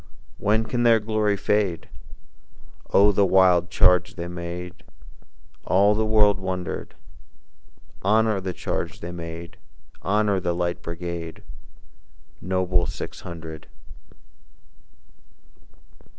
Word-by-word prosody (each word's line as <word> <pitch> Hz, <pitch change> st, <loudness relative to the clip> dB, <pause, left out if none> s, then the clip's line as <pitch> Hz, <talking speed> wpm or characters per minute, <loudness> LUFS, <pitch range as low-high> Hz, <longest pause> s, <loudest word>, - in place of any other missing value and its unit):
When 110 Hz, +2 st, +2 dB
can 120 Hz, +2 st, -2 dB
their 115 Hz, -1 st, +5 dB
glory 105 Hz, -1 st, 0 dB
fade? 100 Hz, -4 st, 0 dB, 1.0 s
Oh, 100 Hz, +1 st, +6 dB
the 100 Hz, 0 st, +3 dB
wild 90 Hz, -2 st, +4 dB
charge 90 Hz, 0 st, +3 dB
they 85 Hz, -1 st, -5 dB
made! 90 Hz, +1 st, -7 dB, 0.8 s
All 100 Hz, +2 st, +4 dB
the 110 Hz, +1 st, 0 dB
world 105 Hz, -2 st, +4 dB
wondered. 95 Hz, -2 st, -4 dB, 1.1 s
Honor 110 Hz, 0 st, +2 dB
the 95 Hz, 0 st, -3 dB
charge 85 Hz, -, -4 dB
they 85 Hz, -, -5 dB
made! 85 Hz, 0 st, -8 dB, 0.4 s
Honor 105 Hz, 0 st, +1 dB
the 90 Hz, -1 st, -1 dB
Light 85 Hz, +1 st, -2 dB
Brigade, 85 Hz, -1 st, -6 dB, 1.0 s
Noble 95 Hz, -1 st, 0 dB
Six -, -, -6 dB
Hundred! 80 Hz, -2 st, -9 dB
95 Hz, 100 wpm, -24 LUFS, 85-105 Hz, 1.1 s, Oh